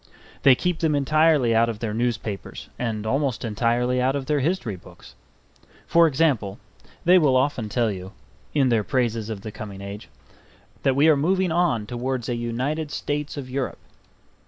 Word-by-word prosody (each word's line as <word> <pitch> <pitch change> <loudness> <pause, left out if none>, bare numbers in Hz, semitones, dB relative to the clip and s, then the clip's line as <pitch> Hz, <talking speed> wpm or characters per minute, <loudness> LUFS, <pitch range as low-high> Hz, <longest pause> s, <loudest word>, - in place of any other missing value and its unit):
They 135 -2 +7
keep 180 +4 -1
them 160 -3 +1
entirely 150 -3 +3
out 115 +1 +3
of 115 - -4
their 110 -1 -3
newspapers 110 -3 -3
and 110 -3 -2
almost 135 +1 -1
entirely 120 +3 +1
out 130 +2 +1
of 140 -2 -3
their 150 +1 +1
history 140 - -1
books. 90 - -15 0.7
For 170 0 +5
example, 135 -10 +1 0.5
they 180 +2 +7
will 140 -5 +3
often 130 -5 0
tell 115 0 +1
you 95 -1 -7 0.4
(in 135 -3 +3
their 115 -3 +2
praises 115 -2 -1
of 105 -3 -5
the 110 - -7
coming 100 -2 -8
age) 100 +1 -8 0.7
that 135 - +2
we 145 +3 +4
are 155 - +6
moving 180 +5 +1
on 160 -11 +1
towards 125 +1 -3
a 120 - 0
United 130 +7 -2
States 145 0 -3
of 135 -3 -5
Europe. 130 +1 -3
125 Hz, 170 wpm, -24 LUFS, 110-150 Hz, 0.7 s, They